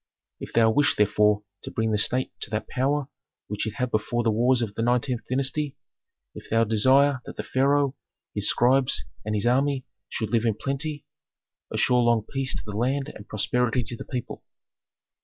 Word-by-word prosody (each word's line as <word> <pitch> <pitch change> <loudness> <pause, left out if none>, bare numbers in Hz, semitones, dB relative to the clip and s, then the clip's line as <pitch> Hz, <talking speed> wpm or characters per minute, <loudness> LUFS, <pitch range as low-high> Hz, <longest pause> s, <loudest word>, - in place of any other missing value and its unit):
If - - -8
thou 115 -1 +5
wish 145 +5 +3
therefore 105 0 +3 0.2
to - - -6
bring 110 0 -1
the 105 - +1
state 125 +4 +1
to - - -4
that 105 +1 -3
power 140 +1 0 0.4
which 105 +2 -3
it 110 - -5
had 125 +1 -2
before 120 +3 0
the 115 - +2
wars 120 +3 +3
of 105 -3 -4
the 115 - -3
nineteenth 120 0 0
dynasty, 135 +2 -1 0.6
if - - -11
thou 115 +1 +3
desire 130 +5 +3
that - - -7
the - - -3
pharaoh, 140 +1 +2 0.4
his - - +1
scribes, 130 +1 +2 0.2
and 105 0 -2
his 105 - 0
army 135 +2 +2 0.2
should 110 - -3
live 115 -1 +2
in 110 -3 +2
plenty, 140 +4 -3 0.7
assure 125 -1 +3
long 120 -2 +3
peace 135 -2 -2
to - - -5
the 105 -1 -6
land 135 +5 -1
and 100 - -12
prosperity 125 +3 0
to 115 +2 -5
the - - -8
people. 125 -3 -5
120 Hz, 185 wpm, -25 LUFS, 110-135 Hz, 0.7 s, thou